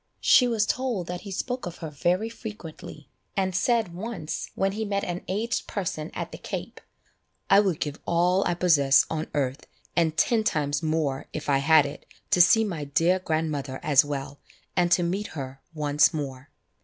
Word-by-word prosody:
She 250 - +5
was 225 -3 +1
told 245 -9 -1
that 175 0 -5
he 200 - -8
spoke 245 +3 -3
of 175 - -7
her 160 -3 -6
very 180 +8 0
frequently, 210 - -9 0.3
and 190 -2 0
said 225 -3 +1
once 185 -4 -5
when 195 0 +1
he 215 +3 -3
met 200 -1 -1
an 175 0 -4
aged 220 +6 -2
person 170 -5 -3
at - - -4
the - - -9
Cape, - - -6 0.7
"I 195 - +8
would 190 -6 +1
give 150 0 -3
all 180 +3 +3
I 175 - 0
possess 145 -6 +4
on 160 0 -2
earth, 135 -1 -2 0.3
and 160 -2 +1
ten 230 -2 +3
times 145 -8 0
more, 155 -4 -1
if 155 - -5
I 135 -1 +4
had 155 +1 +5
it, 145 +1 -8 0.2
to 180 - +5
see 225 +6 +6
my 170 -8 -3
dear 165 +6 +2
grandmother 155 -6 -2
as 145 -3 +5
well, 140 -1 -5 0.4
and 175 -1 +2
to 175 - +4
meet 190 +5 -1
her 135 -1 -6
once 150 -2 +3
more." 135 -2 -5
170 Hz, 180 wpm, -26 LUFS, 145-195 Hz, 0.7 s, I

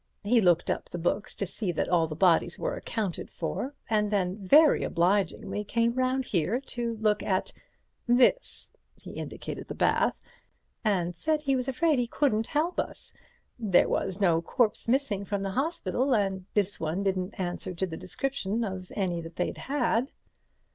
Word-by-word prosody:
He 230 +3 +4
looked 175 -3 +3
up - - -4
the - - -5
books 175 +4 -1
to 200 - -2
see 195 0 -3
that - - -1
all 170 -2 +3
the 155 - -6
bodies 170 0 +3
were - - -2
accounted 220 - -3
for, 255 - -4
and 210 -1 +1
then 190 -3 0
very 300 +10 +6
obligingly 190 +3 0
came 230 +2 +1
round 255 +1 0
here 190 +5 0
to 240 -4 -3
look 215 -1 +1
at 185 -2 -1 0.5
this"—he 245 - +1
indicated - - -6
the - - -6
bath—"and 180 -5 -1
said 310 - 0
he 275 -2 +1
was 255 0 -1
afraid 290 +2 +2
he 245 - 0
couldn't 225 -4 +1
help 320 +4 0
us—there 210 -7 -1
was 190 0 -1
no 170 -5 +3
corpse 225 +6 +1
missing 240 -5 +1
from 200 0 -2
the 195 - -2
hospital, 265 - 0
and 195 -3 -1
this 205 -1 +1
one 165 +5 -2
didn't 190 0 -2
answer 175 0 -3
to 190 - 0
the 165 -3 -6
description 230 +2 -2
of 185 -3 -5
any 180 -4 -1
they'd 165 +2 -4
had." 265 -1 0
210 Hz, 160 wpm, -28 LUFS, 185-250 Hz, 0.5 s, very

